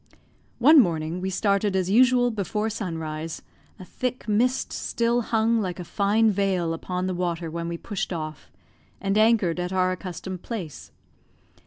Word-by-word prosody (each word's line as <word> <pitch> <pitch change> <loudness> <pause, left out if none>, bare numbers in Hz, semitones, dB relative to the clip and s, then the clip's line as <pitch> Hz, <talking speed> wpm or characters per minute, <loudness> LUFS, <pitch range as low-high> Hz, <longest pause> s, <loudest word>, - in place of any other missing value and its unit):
One 295 +5 +7
morning 170 - +1
we 190 - -2
started 200 +1 +1
as 190 0 0
usual 245 +1 +5
before 215 +1 -2
sunrise; 165 -6 -5 0.3
a 185 - -10
thick 250 +5 -4
mist 245 +5 +1
still 235 +1 0
hung 225 0 +1
like 185 -2 -4
a - - -4
fine 210 +5 +2
veil 185 -4 0
upon 180 +2 -3
the 185 - -1
water 175 -2 -2
when 170 +1 -4
we 170 0 -3
pushed 200 +1 -4
off, 155 -3 -6 0.5
and 195 0 -1
anchored 215 -6 +3
at 180 +1 -2
our 185 -1 +2
accustomed 185 0 -6
place. 185 - -7
190 Hz, 155 wpm, -25 LUFS, 175-220 Hz, 0.5 s, One